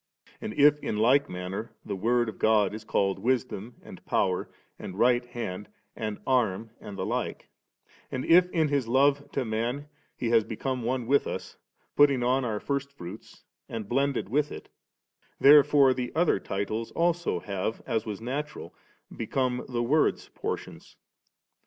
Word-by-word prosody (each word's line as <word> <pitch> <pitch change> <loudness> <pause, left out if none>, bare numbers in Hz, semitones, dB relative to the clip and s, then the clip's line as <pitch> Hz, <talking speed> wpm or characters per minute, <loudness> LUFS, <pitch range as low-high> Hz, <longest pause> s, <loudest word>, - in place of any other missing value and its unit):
And 110 - -5
if 145 +1 +5
ill - - -2
like 125 +6 +3
manner 90 +5 -5
the - - -3
Word 120 +4 +1
of 110 - -7
God 105 -3 +3
is 110 0 -7
called 95 -2 0
Wisdom 120 -2 -1
and - - -12
Power 90 -1 0 0.3
and 95 - -7
Right 120 +2 +4
Hand 120 -5 -6 0.3
and 110 -2 -4
Arm 115 -4 +1
and 100 -1 -9
the - - -2
like, - - -3 0.6
and 130 - -3
if 180 +2 +6
in 160 -4 +1
His 140 -4 0
love 140 +3 +2
to 135 - -1
man 120 +6 -2 0.3
He 120 -2 -1
has 115 -2 +5
become 125 +4 -3
one 125 +1 -1
with 140 +4 +2
us, - - -6 0.4
putting 140 -4 +5
on 130 +2 +2
our 110 -4 -2
first 140 +2 -3
fruits 95 -5 -11 0.3
and 110 -3 -5
blended 135 +2 0
with 145 +7 0
it, - - -9 0.7
therefore 145 -1 +7
the 125 -1 -4
other 160 - +3
titles 105 +4 -3
also 170 - +1
have, 100 +3 -4
as 115 -4 -1
was 105 -3 -5
natural, 140 +6 -5 0.4
become 125 +2 -1
the 120 -1 -1
Word's 150 +6 +1
portions. - - -6
120 Hz, 160 wpm, -28 LUFS, 110-140 Hz, 0.7 s, therefore